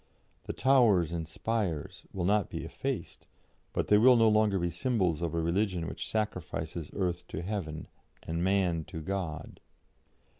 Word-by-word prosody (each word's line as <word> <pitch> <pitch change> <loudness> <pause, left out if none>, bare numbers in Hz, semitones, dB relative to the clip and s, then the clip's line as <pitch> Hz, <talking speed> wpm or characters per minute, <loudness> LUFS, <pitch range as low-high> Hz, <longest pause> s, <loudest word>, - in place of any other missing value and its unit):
The - - -3
'towers 110 - +4
and 85 -2 -3
spires' 90 -3 -3
will 90 -3 -2
not 105 0 +2
be - - -5
effaced, - - -5 0.4
but - - -1
they 105 - +5
will 125 +3 +7
no 115 -1 +5
longer 105 -2 +3
be 85 -1 -1
symbols 90 - 0
of 85 -1 -2
a - - +1
religion 90 +1 0
which - - -5
sacrifices 90 -6 -3
earth 90 -3 -2
to 80 - -5
heaven 85 -6 -4 0.4
and 85 +1 -2
Man 90 -4 +2
to 90 -2 -7
God." 85 -2 -4
90 Hz, 155 wpm, -30 LUFS, 85-105 Hz, 0.4 s, will